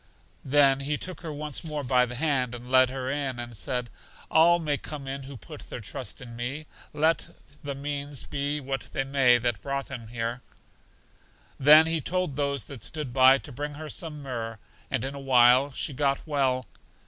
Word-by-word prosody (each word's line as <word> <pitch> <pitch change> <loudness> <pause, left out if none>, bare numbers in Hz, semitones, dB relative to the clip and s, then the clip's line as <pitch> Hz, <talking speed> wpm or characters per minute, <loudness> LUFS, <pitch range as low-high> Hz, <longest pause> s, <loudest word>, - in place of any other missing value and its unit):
Then 135 -1 +4
He 145 +2 -2
took 185 +3 -4
her 165 -3 -5
once 150 -1 -5
more 150 -3 -4
by 125 -1 +3
the 125 - -6
hand 130 -4 +1
and 120 +1 -10
led 130 -1 +6
her 130 0 -5
in, 135 -2 -2
and 120 -1 -6
said, 120 +3 -2 0.4
All 170 +2 +6
may 155 -4 -1
come 140 0 -7
in 135 +1 -4
who 135 0 -9
put 90 - -11
their - - -6
trust - - -5
in 120 -2 -10
me, 130 +6 -4 0.3
let 160 +2 +1 0.4
the 140 -1 -4
means 140 0 -1
be 145 +1 -2
what 135 -1 -5
they 135 - 0
may 135 -3 +4
that 120 -4 -1
brought 140 +2 -3
them 120 -4 -7
here. 115 +2 -4 1.2
Then 150 +3 +8
He 165 -1 0
told 180 -3 -2
those 140 -1 -1
that 130 -7 -9
stood 150 -3 -4
by 130 +1 +7
to 140 - -8
bring 145 +3 -5
her 155 +1 -7
some 150 -4 -3
myrrh, 115 -4 -5 0.3
and - - -1
in 135 +1 -3
a 140 - -7
while 130 +1 +5
she 140 - -2
got 140 0 0
well. 135 -4 0
135 Hz, 195 wpm, -27 LUFS, 125-145 Hz, 1.2 s, Then